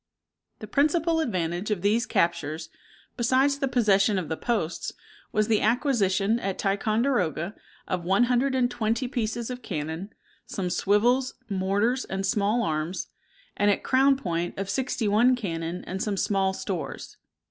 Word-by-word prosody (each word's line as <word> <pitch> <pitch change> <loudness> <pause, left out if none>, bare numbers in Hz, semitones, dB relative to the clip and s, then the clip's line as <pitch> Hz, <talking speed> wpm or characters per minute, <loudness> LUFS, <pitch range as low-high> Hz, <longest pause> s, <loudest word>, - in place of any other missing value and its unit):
The - - -8
principal 325 +3 +2
advantage 180 - -1
of 200 -4 -1
these 225 +4 +2
captures, 165 -4 0 0.5
besides 260 +4 +2
the 275 - +1
possession 210 -5 +3
of 175 -5 -3
the 160 - -1
posts, 175 -6 -2 0.4
was 215 0 +1
the 220 -2 +2
acquisition, 220 -3 +2
at 195 -4 -3
Ticonderoga, 205 - 0 0.3
of 180 -2 -2
one 195 +6 +3
hundred 250 +2 +2
and 245 -1 +2
twenty 230 +3 -1
pieces 235 -1 -2
of 250 0 -6
cannon, 165 0 -4 0.4
some 180 -2 -3
swivels, 240 +8 +2
mortars, 200 +6 0
and 195 0 -3
small 210 +3 +1
arms; 160 0 -2 0.5
and 205 - +2
at 200 - +1
Crown 270 +1 +4
Point, 175 -7 -3
of 195 0 -3
sixty 245 -1 -1
one 235 +5 +4
cannon 170 -5 -4
and 190 +1 -4
some 205 -2 -1
small 195 -1 +1
stores. 190 -3 -5
210 Hz, 145 wpm, -26 LUFS, 185-245 Hz, 0.5 s, Crown